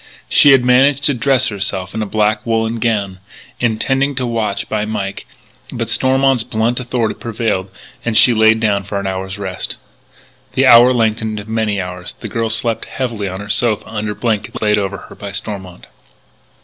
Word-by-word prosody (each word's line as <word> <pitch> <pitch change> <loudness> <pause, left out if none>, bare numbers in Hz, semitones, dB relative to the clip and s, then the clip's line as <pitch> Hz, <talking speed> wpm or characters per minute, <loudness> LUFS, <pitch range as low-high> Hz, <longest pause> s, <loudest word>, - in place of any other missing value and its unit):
She 145 - +5
had 135 -3 +6
managed 135 +3 +4
to 145 - +3
dress 130 0 +2
herself 95 -2 -3
in 110 - -3
a 105 - -2
black 105 +1 +1
wool 115 -1 0
gown, 110 -5 -1 0.4
intending 135 +4 0
to 130 -1 0
watch 115 -4 -2
by 105 -1 -1
Mike, 100 -2 -4 0.4
but - - -4
Stormont's 135 -1 +2
blunt 115 +2 -1
authority 120 -3 -1
prevailed 110 -4 -2 0.3
and 115 -2 0
she 125 - +6
lay 110 0 +5
down 105 -3 0
for 100 +1 -3
an 100 - -5
hour's 95 +1 -4
rest. 95 -2 -3 0.8
The - - +2
hour 120 +2 +8
lengthened 110 -2 0
into 105 +2 -9
many 110 -3 0
hours; 90 -1 -6
the - - -6
girl 115 -1 -2
slept 115 +1 -1
heavily 115 -6 -3
on 95 +1 -5
her 100 - -9
sofa 110 -1 0
under 105 -1 -4
blankets 110 -3 -2
laid 105 -1 +2
over 100 0 -3
her - - -12
by 100 - -7
Stormont. 95 -3 -6
110 Hz, 175 wpm, -17 LUFS, 100-120 Hz, 0.8 s, hour